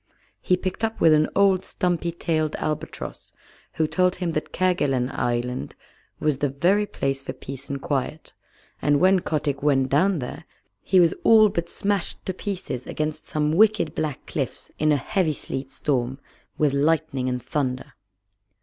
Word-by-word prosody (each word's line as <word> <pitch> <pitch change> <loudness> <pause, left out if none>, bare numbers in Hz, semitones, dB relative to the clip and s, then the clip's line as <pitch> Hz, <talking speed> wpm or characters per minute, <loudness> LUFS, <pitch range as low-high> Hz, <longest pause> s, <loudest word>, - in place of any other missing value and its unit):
He 180 - +2
picked 185 +4 -4
up 225 0 -1
with 160 - +6
an 155 0 +3
old 195 -2 +4
stumpy 175 -2 -1
tailed 155 -2 -1
albatross, 155 -1 -5 0.4
who 160 - +1
told 180 +2 +2
him 180 -2 -2
that 155 -1 -3
Kerguelen 140 -9 +1
Island 120 +1 -2 0.4
was 150 -3 0
the 145 - +1
very 180 +10 +2
place 135 -5 -2
for 130 -1 -6
peace 135 +1 -9
and 140 0 -3
quiet, 145 +3 -3 0.5
and 145 -1 +3
when 190 +1 +5
Kotick 150 -5 -2
went 135 -2 +2
down 180 +7 +3
there 145 +4 -6 0.4
he 190 - +3
was 170 -2 +5
all 215 -2 +7
but 170 -3 -3
smashed 200 -2 -2
to 190 - -2
pieces 180 - -4
against 155 0 -3
some 150 0 0
wicked 210 -1 +3
black 155 -3 -3
cliffs - - -4
in 155 0 +3
a 145 - +4
heavy 160 +5 0
sleet 135 -1 -5
storm 130 -2 -1 0.4
with 150 -3 +2
lightning 145 -3 +1
and 125 0 -1
thunder. 130 -4 -2
155 Hz, 160 wpm, -24 LUFS, 135-180 Hz, 0.5 s, all